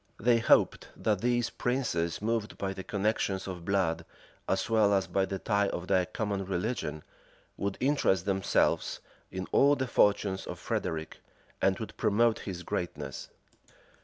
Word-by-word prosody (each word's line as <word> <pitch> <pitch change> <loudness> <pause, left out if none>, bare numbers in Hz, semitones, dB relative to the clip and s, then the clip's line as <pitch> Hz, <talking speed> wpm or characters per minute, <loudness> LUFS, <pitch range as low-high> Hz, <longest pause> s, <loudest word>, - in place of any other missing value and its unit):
They 115 +1 +4
hoped - - +3
that 105 -3 0
these 120 0 +1
princes, 85 -9 -1
moved 115 -1 -1
by 95 -1 -2
the 95 0 -7
connections 100 -2 -1
of 90 -2 -6
blood, 85 -4 +1 0.5
as - - +1
well 105 -3 +4
as 95 - +1
by 95 -1 +1
the 95 - -4
tie 100 0 +1
of 90 - -4
their 95 -2 +2
common 100 -3 -2
religion, 90 -5 -3 0.5
would 100 0 -3
interest 130 -10 +2
themselves 95 -1 +1 0.3
in 95 0 -4
all 145 +1 +5
the 130 - -1
fortunes 100 -5 +2
of - - -5
Frederic, 80 -1 -3 0.4
and - - +3
would - - -7
promote 115 +2 +3
his 90 -3 -6
greatness. 90 0 -4
100 Hz, 150 wpm, -30 LUFS, 95-110 Hz, 0.5 s, all